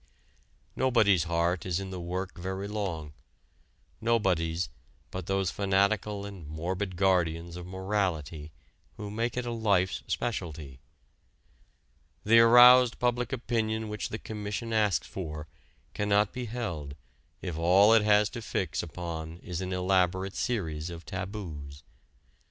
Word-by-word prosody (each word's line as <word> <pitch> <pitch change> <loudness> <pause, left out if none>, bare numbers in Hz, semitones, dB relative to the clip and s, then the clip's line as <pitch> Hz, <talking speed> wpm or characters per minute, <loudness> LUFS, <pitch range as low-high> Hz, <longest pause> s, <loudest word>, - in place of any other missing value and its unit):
Nobody's 110 - +3
heart 85 +1 0
is 90 -1 -1
in 95 -1 -6
the 90 - -5
work 90 +2 -4
very 95 +2 -4
long; 90 -8 -4 0.9
nobody's 90 -7 +1 0.4
but 95 -2 -6
those 95 -2 0
fanatical 100 +1 +1
and 95 -6 -9
morbid 90 +5 -3
guardians 85 -3 +1
of 90 0 -7
morality 90 -6 -2 0.5
who 105 -1 -6
make 115 +3 -2
it 125 - -1
a 120 - -3
life's 100 -5 +1
specialty. 80 - -4 1.4
The 115 +2 +6
aroused 120 +1 +8
public 125 0 0
opinion 110 -3 -1
which 105 0 -4
the 110 - -4
Commission 110 +2 -5
asks 105 -3 +2
for 75 -4 -6 0.5
cannot 105 0 +2
be 125 -1 -4
held 85 -12 -4 0.5
if 90 -4 -3
all 95 +6 +5
it 115 - +6
has 105 0 +4
to 120 +2 -7
fix 95 -6 -2
upon 85 -1 -6
is 90 -1 -4
an 95 0 -4
elaborate 95 +1 +1
series 85 -9 -2
of 85 -1 -9
taboos. 90 -8 -6
95 Hz, 130 wpm, -29 LUFS, 85-105 Hz, 1.4 s, aroused